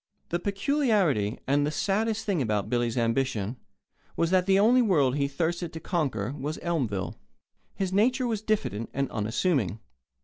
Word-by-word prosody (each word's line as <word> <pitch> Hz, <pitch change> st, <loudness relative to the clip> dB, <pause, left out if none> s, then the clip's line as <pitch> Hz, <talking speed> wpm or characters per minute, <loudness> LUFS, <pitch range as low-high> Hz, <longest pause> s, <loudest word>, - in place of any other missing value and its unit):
The 170 Hz, -, 0 dB
peculiarity 200 Hz, -, +1 dB
and 145 Hz, +2 st, +2 dB
the 145 Hz, -, +1 dB
saddest 215 Hz, +7 st, 0 dB
thing 190 Hz, -7 st, 0 dB
about 105 Hz, -3 st, -1 dB
Billy's 120 Hz, -1 st, 0 dB
ambition 115 Hz, -2 st, 0 dB, 0.6 s
was 165 Hz, +1 st, +1 dB
that 185 Hz, 0 st, +3 dB
the 195 Hz, 0 st, +5 dB
only 235 Hz, +5 st, +5 dB
world 150 Hz, -, +3 dB
he 140 Hz, -1 st, +1 dB
thirsted 170 Hz, +4 st, -2 dB
to 160 Hz, -, -5 dB
conquer 135 Hz, -, -1 dB
was 150 Hz, +3 st, -4 dB
Elmville. 130 Hz, -, -2 dB, 0.6 s
His 190 Hz, -1 st, -2 dB
nature 250 Hz, +6 st, +3 dB
was 225 Hz, -4 st, -1 dB
diffident 210 Hz, -, -1 dB
and 140 Hz, -1 st, -1 dB
unassuming. 110 Hz, -, 0 dB
160 Hz, 150 wpm, -27 LUFS, 120-195 Hz, 0.6 s, the